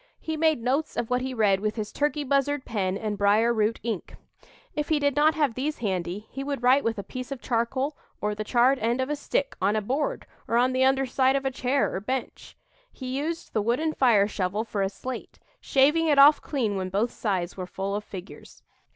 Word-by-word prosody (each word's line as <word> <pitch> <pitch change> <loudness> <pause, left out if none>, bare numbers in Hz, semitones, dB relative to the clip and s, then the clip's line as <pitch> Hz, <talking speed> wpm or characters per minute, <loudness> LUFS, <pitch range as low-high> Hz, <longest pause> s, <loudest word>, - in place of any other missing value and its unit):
He 315 - -4
made 315 -6 +2
notes 275 +6 -1
of 240 0 -2
what 250 0 +2
he 260 +1 -3
read 210 -6 +2
with 215 +1 -2
his 215 -2 -4
turkey 295 0 0
buzzard 280 0 0
pen 195 -4 -1
and 210 -1 -4
brier 215 +4 +4
root 220 0 0
ink. 220 -6 -4 0.6
If 300 0 -2
he 315 - +3
did 285 -2 +1
not 305 +2 +4
have 290 -6 +1
these 285 +6 -2
handy, 190 -2 -3
he 270 - -5
would 275 -3 -4
write 260 +3 +5
with 230 0 -1
a 200 - -4
piece 255 +6 -7
of 275 - -4
charcoal 260 +5 -1 0.2
or 210 0 -1
the 215 +1 -4
charred 250 +4 +3
end 235 +3 0
of 260 +2 -1
a - - +1
stick, 285 -1 -2
on 200 +3 +2
a 215 - +1
board, 290 - -2 0.2
or 230 - +1
on 250 +2 +3
the 260 0 +2
under 270 0 +3
side 260 +1 +2
of 275 0 -1
a 270 - +1
chair 265 +2 0
or - - -2
bench. 255 +5 -5 0.3
He 260 -1 -6
used 320 +4 -4
the 215 - +1
wooden 255 +9 0
fire 225 -8 +4
shovel 200 +1 -2
for 215 -3 -3
a 195 - +1
slate, 245 +6 -7 0.2
shaving 300 +5 +3
it 295 -2 +3
off 285 +2 +8
clean 225 -9 -1
when 185 -1 -3
both 205 +5 0
sides 185 -5 -2
were 185 -1 -5
full 195 +2 -4
of 210 - -3
figures. 190 -2 -11
250 Hz, 225 wpm, -26 LUFS, 210-275 Hz, 0.6 s, off